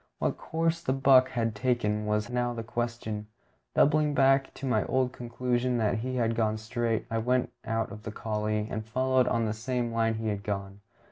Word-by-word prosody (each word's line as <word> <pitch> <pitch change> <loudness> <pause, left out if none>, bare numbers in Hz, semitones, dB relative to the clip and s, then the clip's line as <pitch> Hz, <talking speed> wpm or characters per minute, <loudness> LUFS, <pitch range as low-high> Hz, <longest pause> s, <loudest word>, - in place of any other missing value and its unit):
What - - 0
course 165 +1 -1
the 130 - 0
buck 130 -1 +5
had 115 -3 -1
taken, 105 -2 0
was 105 +2 0
now 120 0 0
the 115 - -4
question. 120 -3 -3 0.5
Doubling 150 0 +4
back 135 0 +4
to 135 - -6
my 110 -6 +2
old 130 -1 +1
conclusion 125 +1 -1
that 110 0 +1
he 130 +3 -3
had 115 -2 +1
gone 110 -1 +1
straight, 115 0 -1
I 115 - +1
went 125 +1 +1
out 115 -2 -1
of 105 +2 -8
the 110 - -6
coulée, 105 -1 -2
and 110 - -3
followed 130 +3 +2
on 115 -1 +1
the 115 +3 -1
line 115 -1 +1
he 110 0 -2
had 100 -1 -2
gone. 100 -1 -4
115 Hz, 190 wpm, -29 LUFS, 110-130 Hz, 0.5 s, buck